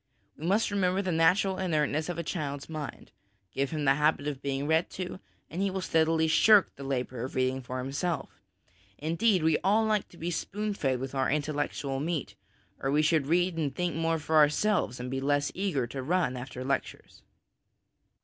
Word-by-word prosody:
We 160 - -5
must 205 +3 +2
remember 190 -1 +1
the 185 - -1
natural 180 +4 +3
inertness 155 -3 0
of 175 - -3
a 170 - -2
child's 145 -4 -4
mind; 155 -5 -7 0.4
give 135 +4 -1
him 155 -2 -2
the 135 - +6
habit 150 0 +1
of 140 -2 -4
being 140 0 -2
read 160 +2 +2
to, 185 0 -6 0.3
and 175 - -4
he 200 - +2
will 190 0 -3
steadily 160 -2 +2
shirk 205 +5 +5
the 140 - -9
labour 125 -3 -3
of 130 - -6
reading 130 0 0
for 130 0 -6
himself; 145 +7 -3 0.6
indeed, 170 +4 +1
we 160 -1 +3
all 210 +4 +3
like 215 -2 0
to 175 - -16
be 170 +2 -3
spoon 210 +4 -2
fed 135 -9 -1
with 135 +1 -5
our 135 -1 +1
intellectual 145 -2 -1
meat, 155 0 -2 0.5
or 135 - -1
we 150 +2 +3
should 155 -3 +2
read 175 +2 +2
and 140 -4 -1
think 175 -4 -1
more 165 0 +1
for 160 +1 0
ourselves 150 - +3
and 125 +1 -5
be 135 0 -2
less 145 +1 +1
eager 180 -10 -1
to 130 +3 -6
run 160 -2 0
after 125 0 -6
lectures. 140 +1 -3
155 Hz, 190 wpm, -29 LUFS, 135-180 Hz, 0.6 s, the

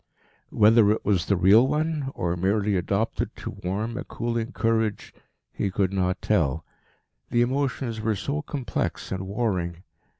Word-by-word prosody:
Whether 110 0 +5
it 110 - 0
was 95 -3 +1
the 100 - +3
real 100 +8 +6
one, 150 -1 -1
or 85 0 -1
merely 100 +3 +1
adopted 100 +5 -1
to - - -6
warm 105 +6 -2
a - - -3
cooling 115 +1 -3
courage, 110 -2 -1 0.4
he 100 - -1
could 95 0 0
not 95 -1 -1
tell. 80 -7 +1 0.6
The 120 0 +3
emotions 130 -3 -1
were 110 0 0
so 140 +9 -2
complex 130 -9 -3
and 95 0 -3
warring. 95 -5 -2
105 Hz, 145 wpm, -25 LUFS, 95-120 Hz, 0.6 s, real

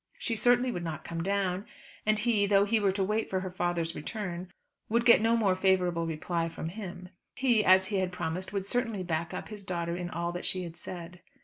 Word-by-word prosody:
She 230 - -2
certainly 245 +2 +4
would 175 -6 -4
not 160 -3 -4
come 165 -1 -4
down; 195 0 0 0.4
and 215 0 +4
he, 215 -2 +2
though 200 0 +5
he 225 +2 +2
were 200 -2 +3
to 195 0 0
wait 215 +3 0
for 190 -1 -1
her 185 -1 -5
father's 175 -2 -1
return, 180 0 -5 0.4
would 235 +2 +2
get 235 -3 +7
no 230 +1 +3
more 205 -5 +3
favourable 180 -3 +2
reply 165 +1 -2
from 165 0 -5
him. 180 -2 -7 0.3
He, 240 -5 +3
as 190 0 +6
he 205 - 0
had 185 -1 0
promised, 180 +1 -3
would 200 -2 -2
certainly 225 -3 -1
"back 165 -1 -2
up" - - -6
his 210 -2 -8
daughter 170 -2 -2
in 175 -1 -4
all 170 +1 -2
that 175 +1 -5
she 185 -1 +1
had 170 -1 -7
said. 175 0 -8
185 Hz, 220 wpm, -30 LUFS, 175-210 Hz, 0.4 s, get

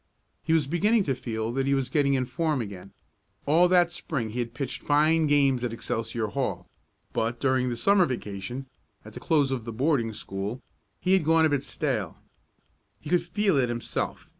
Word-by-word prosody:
He 160 - -3
was 160 -3 +3
beginning 205 - +2
to 140 - 0
feel 110 -3 -3
that 135 +2 -1
he 140 - +3
was 135 -2 -2
getting 140 -2 +2
in 130 -1 0
form 155 +3 -1
again. 100 -4 -7 0.5
All 165 +5 +5
that 175 -1 +4
Spring 125 -10 -3
he 120 - -4
had 120 -1 -3
pitched 135 -1 -4
fine 155 +2 +3
games 140 -4 +3
at 120 -2 -2
Excelsior 115 -1 -3
Hall, 135 +3 -3 0.5
but, 115 +1 -1
during 130 -2 +1
the 120 - -3
Summer 195 +6 +4
vacation, 120 +1 -5 0.4
at - - -11
the - - -8
close 145 -4 +2
of 130 -3 -2
the 115 - -6
boarding 125 -1 +1
school, 100 +4 -5 0.4
he 185 - +2
had 190 - +4
gone 160 +1 +4
a - - +3
bit 145 -2 +1
stale. - - -3 0.8
He 150 - -8
could 180 -1 +4
feel 195 0 +1
it 125 -3 +2
himself. 120 0 -4
135 Hz, 190 wpm, -27 LUFS, 120-160 Hz, 0.8 s, All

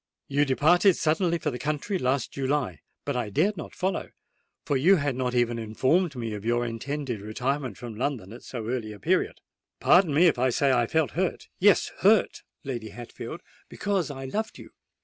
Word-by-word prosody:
You 145 +1 +2
departed 170 +8 +4
suddenly 165 +2 +1
for 150 -2 -2
the 125 - -6
country 155 +6 -2
last 130 +2 0
July: 135 - -1 0.3
but 140 - -2
I 120 -4 -1
dared 180 - +1
not 160 - -8
follow—for 185 -5 -5
you 165 +9 +5
had 145 -6 -1
not 125 -1 -1
even 120 -1 +1
informed 135 - +1
me 115 -3 -4
of 105 -1 -6
your 120 +1 +1
intended 120 0 -4
retirement 125 +3 -2
from 120 0 -7
London 115 -5 -3
at 120 - -10
so 120 -4 -6
early 115 -3 -3
a 105 - -12
period. - - 0 0.4
Pardon 175 -3 +5
me 155 +5 +5
if 155 -7 +3
I 130 +1 +3
say 135 +3 +2
I 120 -2 +2
felt 160 +1 +1
hurt,—yes, 190 +3 +1
hurt, 210 +1 +3 0.2
Lady 120 -6 -5
Hatfield,—because 175 - -5
I 135 -2 -6
loved 215 +11 -3
you! - - -12
135 Hz, 175 wpm, -26 LUFS, 120-160 Hz, 0.4 s, you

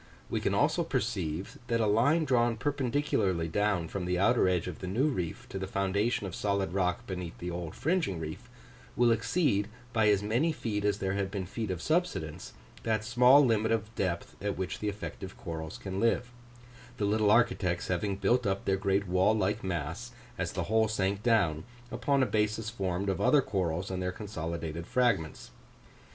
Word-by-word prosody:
We - - 0
can - - 0
also - - +2
perceive, 95 -6 -2
that 115 -1 +1
a 110 - +2
line 135 +10 +3
drawn 120 -4 +2
perpendicularly 130 - 0
down 100 -1 0
from 90 +1 -4
the 90 0 0
outer 95 0 +4
edge 90 -2 0
of - - -6
the 90 - -5
new 120 +11 +1
reef, 90 - -4
to 95 - -5
the 95 - -3
foundation 100 +4 0
of 95 - -5
solid 100 -3 -1
rock 90 -2 0
beneath 90 -3 -5
the 90 0 -5
old 85 -2 -5
fringing 160 - 0
reef, 80 -1 -7 0.5
will 120 -1 +4
exceed 115 - +1 0.3
by 110 -2 +4
as 100 -1 +3
many 120 +10 +1
feet 105 -7 -3
as 100 -1 +2
there 95 -2 -1
have 100 -1 -1
been 95 -1 -4
feet 110 +3 -4
of 90 -2 -3
subsidence, 125 - -1 0.3
that 110 -1 0
small 125 +4 +6
limit 110 -2 +2
of 110 0 -1
depth 90 -6 -2
at 100 -1 -1
which 90 -4 -3
the 105 - -1
effective 100 -2 -7
corals 80 -2 -6
can 95 -1 -5
live: 115 +2 +1 0.7
the 105 - 0
little 105 0 +2
architects 110 -6 +2
having 95 +2 -1
built 110 +5 +2
up 95 0 -1
their 95 0 +2
great 100 0 0
wall 95 +4 +3
like 105 0 0
mass, 90 - -4 0.2
as 90 -3 -3
the - - -2
whole 110 +1 +2
sank 100 -2 -1
down, 100 -10 +2 0.3
upon 135 +2 +1
a - - +3
basis 110 0 0
formed 95 -3 -2
of 95 - -1
other 145 -3 +5
corals 90 -3 -2
and 95 0 -3
their 90 0 -1
consolidated 85 -4 -5
fragments. 120 -11 0
100 Hz, 185 wpm, -30 LUFS, 90-115 Hz, 0.7 s, small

